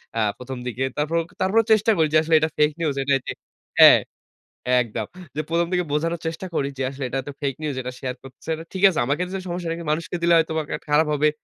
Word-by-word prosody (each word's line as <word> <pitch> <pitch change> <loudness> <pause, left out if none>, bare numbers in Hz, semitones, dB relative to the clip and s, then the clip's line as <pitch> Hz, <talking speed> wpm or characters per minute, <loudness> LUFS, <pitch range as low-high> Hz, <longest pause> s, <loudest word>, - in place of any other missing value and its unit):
অ্যা 115 - +1
১ম 125 0 -7
দিকে। 125 +2 -2
তারপরে, 155 +3 +1 0.2
তারপরেও 210 +4 +3
চেষ্টা 215 +1 +3
করি 160 -2 +3
যে, 155 - +6
আসলে 160 0 +3
এটা 160 - +1
ফেক 150 0 +4
নিউজ 155 -4 0
এটা 140 - +1 0.7
হ্যাঁ, - - +10 0.8
একদম। 110 -2 -5 0.3
যে, - - 0
১ম 170 +1 +2
দিকে 180 -1 +1
বোঝানোর 165 +3 -1
চেষ্টা 165 +3 -4
করি 140 - 0
যে, - - -1
আসলে 135 0 -6
এটা 135 +2 -2
তো 145 - -5
ফেক 140 -2 -1
নিউজ 150 -2 -2
এটা 125 0 -5
শেয়ার 130 -1 -3
করছে, 135 +4 -10 0.2
ঠিক 190 - -5
আছে। 185 - -2
আমাকে 145 +5 0
তো - - -1
সমস্যা 175 -1 -4
কিন্তু 165 - -7
মানুষকে 170 +3 -2
দিলে 170 0 +4
হয়তোবা 160 -1 0
কা - - -1
খারাপ 150 +2 +4
হবে। 150 +1 +3
155 Hz, 220 wpm, -23 LUFS, 135-170 Hz, 0.8 s, হ্যাঁ